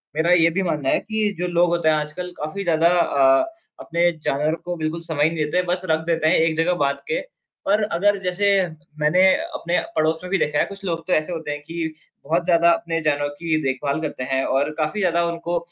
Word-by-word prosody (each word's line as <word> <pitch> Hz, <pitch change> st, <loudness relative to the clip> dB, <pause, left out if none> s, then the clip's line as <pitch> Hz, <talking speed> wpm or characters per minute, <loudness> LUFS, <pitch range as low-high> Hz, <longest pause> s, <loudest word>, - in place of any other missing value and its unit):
मेरा 165 Hz, +3 st, +2 dB
ये 165 Hz, -1 st, +5 dB
भी 195 Hz, -, +1 dB
मानना 150 Hz, -6 st, -1 dB
है -, -, +3 dB
कि 215 Hz, -1 st, -1 dB
जो 180 Hz, -, -2 dB
लोग 175 Hz, 0 st, +2 dB
होते 170 Hz, -2 st, +2 dB
हैं 155 Hz, -, +4 dB
आजकल 155 Hz, +4 st, -4 dB
काफ़ी 155 Hz, +7 st, -4 dB
ज़्यादा 165 Hz, -1 st, +3 dB
अ, 140 Hz, -, +3 dB, 0.3 s
अपने 170 Hz, +1 st, +1 dB
जानवर 150 Hz, +3 st, 0 dB
को 175 Hz, -, -3 dB
बिल्कुल 160 Hz, +1 st, -3 dB
समय 160 Hz, -3 st, -1 dB
ही 155 Hz, -, +4 dB
नहीं 160 Hz, -2 st, -2 dB
देते, 175 Hz, +5 st, +1 dB
बस 180 Hz, +1 st, -1 dB
रख 160 Hz, 0 st, +3 dB
देते 165 Hz, -2 st, +1 dB
हैं -, -, +4 dB
एक 160 Hz, -1 st, +2 dB
जगह 170 Hz, +2 st, +2 dB
बाँध 140 Hz, 0 st, 0 dB
के। 485 Hz, +2 st, -1 dB, 0.5 s
और 210 Hz, +1 st, +3 dB
अगर 205 Hz, +1 st, +1 dB
जैसे 185 Hz, +2 st, 0 dB, 0.5 s
मैंने 155 Hz, +5 st, +3 dB, 0.2 s
अपने 180 Hz, -, -2 dB, 0.2 s
पड़ोस 160 Hz, +1 st, +1 dB
में 180 Hz, -, -6 dB
भी 195 Hz, -, +3 dB
देखा 150 Hz, -3 st, 0 dB
है -, -, +3 dB
कुछ 200 Hz, 0 st, -11 dB
लोग 165 Hz, -3 st, -3 dB
तो 185 Hz, -, +1 dB
ऐसे 155 Hz, +3 st, +1 dB
होते 160 Hz, -3 st, -4 dB
हैं 145 Hz, 0 st, -5 dB
कि, 165 Hz, -1 st, -4 dB, 0.3 s
बहुत 165 Hz, +4 st, 0 dB
ज़्यादा 170 Hz, -1 st, +4 dB
अपने 165 Hz, 0 st, -1 dB
जानवर 145 Hz, -1 st, 0 dB
की 165 Hz, -2 st, 0 dB
देखभाल 140 Hz, +3 st, -1 dB
करते 145 Hz, -4 st, -4 dB
हैं 135 Hz, 0 st, +1 dB
और 140 Hz, +3 st, +1 dB
काफ़ी 155 Hz, +7 st, -1 dB
ज़्यादा 170 Hz, -2 st, +2 dB
उनको 170 Hz, 0 st, -2 dB
165 Hz, 225 wpm, -22 LUFS, 155-180 Hz, 0.5 s, ये